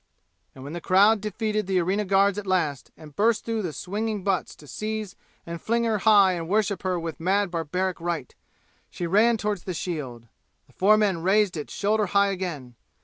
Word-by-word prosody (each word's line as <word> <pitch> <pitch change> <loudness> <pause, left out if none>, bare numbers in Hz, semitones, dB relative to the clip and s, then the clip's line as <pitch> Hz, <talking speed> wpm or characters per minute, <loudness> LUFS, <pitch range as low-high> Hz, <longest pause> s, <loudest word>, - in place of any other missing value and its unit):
And 130 - -11
when 145 +3 -7
the 175 - -5
crowd 200 +4 +4
defeated 215 -1 -2
the 190 -1 +1
arena 190 +4 0
guards 200 +1 +3
at 200 - -8
last 155 -8 -1
and 155 -3 -14
burst 220 +1 +2
through 225 -1 -1
the 175 -5 -3
swinging 210 +4 -4
butts 195 -3 -1
to 150 - -16
seize 215 - -5 0.3
and 170 -1 -7
fling 235 +1 0
her 220 -2 0
high 200 -3 +5
and 165 -2 -5
worship 205 -2 +1
her 185 -2 -1
with 165 -1 -6
mad 190 +3 +1
barbaric 180 +2 -2
rite, 170 -6 -3 0.6
she 175 - -5
ran 220 +7 +3
toward 210 -2 -2
the 180 +1 -6
shield. 135 -10 -5 0.4
The - - -26
four 210 +3 +4
men 200 -6 +1
raised 195 +1 +2
it 150 -2 -5
shoulder 210 +1 0
high 200 0 +3
again. 170 -10 -5
190 Hz, 195 wpm, -25 LUFS, 170-210 Hz, 0.6 s, high